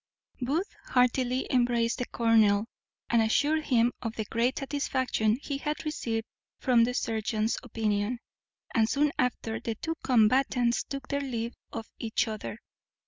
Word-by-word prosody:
Booth 305 - -1
heartily 250 0 +2
embraced 240 -2 +2
the 250 - -2
colonel, 220 -3 +3 0.5
and 235 -1 +5
assured 295 +8 +2
him 240 -1 +3
of 225 -1 -4
the 220 - -3
great 235 +5 0
satisfaction 260 -6 0
he 280 -2 -3
had 300 +2 -3
received 225 -7 -2 0.3
from 245 -3 +4
the 250 - -2
surgeon's 220 -1 0
opinion; 220 -1 -1 0.6
and 220 0 +3
soon 290 +3 +2
after 230 -3 0
the 230 -1 -3
two 325 +9 -3
combatants 245 0 +3
took 275 -1 -6
their 280 0 0
leave 235 -4 -3 0.2
of 225 -1 -5
each 225 -1 0
other. 215 -1 -5
240 Hz, 140 wpm, -29 LUFS, 225-265 Hz, 0.6 s, and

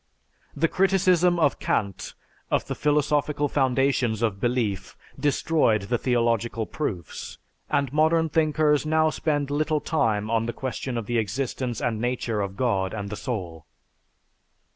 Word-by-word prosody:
The 165 +3 +2
criticism 180 -2 +3
of 145 -4 +2
Kant 100 -3 -2 0.3
of - - +1
the - - -3
philosophical 150 0 +1
foundations 130 -4 +1
of 105 -4 0
belief 110 -6 -1 0.2
destroyed 145 - +2
the 120 +4 -1
"theological 115 -2 0
proofs," 100 - -5 0.3
and 140 -2 0
modern 160 +2 +3
thinkers 155 -1 +2
now 155 0 +2
spend 145 -3 -1
little 155 +1 +1
time 110 -10 0
on 115 0 +1
the 120 - -2
question 130 -1 -4
of 115 - -3
the 120 +2 0
existence 120 +2 -2
and 110 -2 -1
nature 120 -3 -1
of 100 -1 -4
God 100 -6 0
and 100 -1 -5
the - - -3
soul. 90 - -5
125 Hz, 140 wpm, -25 LUFS, 110-150 Hz, 0.3 s, criticism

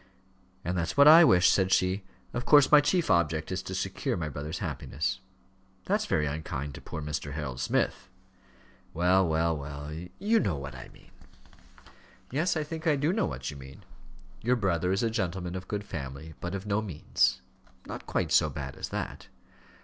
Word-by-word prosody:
"And 90 +2 -1
that's 85 +6 -2
what 140 +1 +8
I 165 +3 +10
wish," 90 - +6
said 95 -1 +3
she. 95 +2 +2 0.3
"Of 125 - -2
course 145 -1 +6
my 150 -1 +9
chief 170 - +1
object 85 -2 +1
is 95 0 -2
to 95 - -6
secure 95 0 -2
my 80 -3 -3
brother's 75 +2 -5
happiness." 80 +7 -3 0.7
"That's - - 0
very 75 -1 +1
unkind 75 -1 -4
to - - -9
poor 80 -2 -6
Mr. 75 -1 -4
Harold 70 -4 -5
Smith." 65 - -1 0.9
"Well, 90 +2 +3
well, 80 +1 +1
well 70 +1 -7 0.2
you 220 +4 +2
know 95 -8 0
what 70 -1 -6
I - - -10
mean." - - -20 1.2
"Yes, 160 +6 +1
I 155 - 0
think 160 +2 -5
I 155 - +4
do 145 +5 +1
know 220 - +1
what 65 0 -5
you 70 - -10
mean. 65 0 -12 0.6
Your 125 +3 +2
brother 90 -5 0
is 95 +4 +1
a 115 - +1
gentleman 90 -4 -2
of 90 0 -6
good 105 -1 -3
family, 70 -3 -7
but 85 +2 -3
of 95 +1 -5
no 105 +1 0
means." 90 -8 0 0.4
"Not - - -8
quite - - -1
so - - +4
bad - - -6
as - - -5
that." - - -5
90 Hz, 185 wpm, -28 LUFS, 75-110 Hz, 1.2 s, I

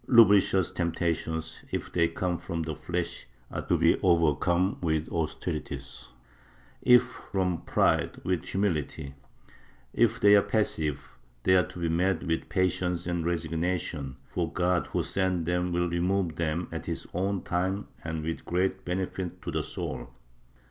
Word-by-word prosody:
Lubricious 100 -5 +6
temptations, 80 -1 -2
if - - -3
they 85 -1 +4
come 90 +1 -1
from 85 -3 -3
the 80 -1 -3
flesh 85 0 -4 0.2
are - - -3
to - - +1
be - - +4
overcome 85 +2 +3
with 80 -2 0
austerities; 80 0 -4 0.7
if 125 0 +7
from 95 -7 -2
pride, - - +2
with 90 -2 0
humility; 80 -7 -1 0.8
if 115 -1 +3
they 105 0 +7
are 100 - +7
passive, 80 -10 -1 0.2
they 95 - +5
are 90 - +4
to - - -11
be 85 -1 -1
met 90 +2 +1
with 80 -1 -2
patience 90 -1 0
and 85 -1 -1
resignation, 80 -4 -2
for 85 -2 -2
God 90 0 +1
who - - -1
sends 95 -3 0
them 90 +1 0
will 85 0 +1
remove 85 0 0
them 85 +1 -1
at - - -5
his - - -3
own 95 +1 -1
time 95 +3 -1 0.2
and 80 -1 -3
with 80 +1 -3
great 95 +2 0
benefit 90 0 -3
to - - -3
the - - 0
soul. - - -5
90 Hz, 150 wpm, -28 LUFS, 80-95 Hz, 0.8 s, if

